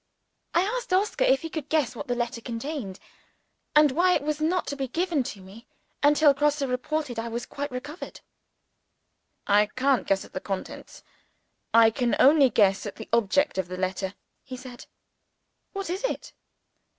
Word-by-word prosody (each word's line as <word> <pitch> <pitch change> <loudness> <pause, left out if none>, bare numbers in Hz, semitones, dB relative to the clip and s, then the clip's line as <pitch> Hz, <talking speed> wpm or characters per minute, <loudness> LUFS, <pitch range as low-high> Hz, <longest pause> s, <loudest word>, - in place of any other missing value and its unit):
I 345 - +5
asked 470 +2 -3
Oscar 390 +3 +2
if 270 +3 +3
he 325 - -4
could 300 -3 -5
guess 280 -6 +1
what 280 - -6
the 245 - 0
letter 240 0 -3
contained, 230 -4 -5 0.8
and 300 -2 +6
why 360 +6 +3
it - - -1
was 305 0 -2
not 350 +3 +1
to 285 - -3
be 270 -1 -3
given 335 +2 0
to 205 -5 -6
me 195 +5 -14 0.3
until 290 0 +5
Grosse 295 +1 +1
reported 260 +1 -2
that 225 - -2
I - - -4
was 235 +1 -4
quite 285 0 -5
cured. 290 +7 -8 1.2
"I 210 +1 +4
can't 255 +3 +1
guess 195 0 +1
at - - -18
the - - -3
contents 195 0 -7 0.7
I 225 -1 +6
can 245 0 0
only 280 -1 +6
guess 200 -2 +2
at 205 - -7
the - - -10
object 235 +2 +2
of 185 - -1
the 185 +1 -6
letter," 185 +1 -2 0.3
he 260 -2 -8
said. 250 -1 -11 0.8
"What 390 -1 -5
is 370 +6 -3
it?" - - -3
265 Hz, 175 wpm, -26 LUFS, 230-305 Hz, 1.2 s, and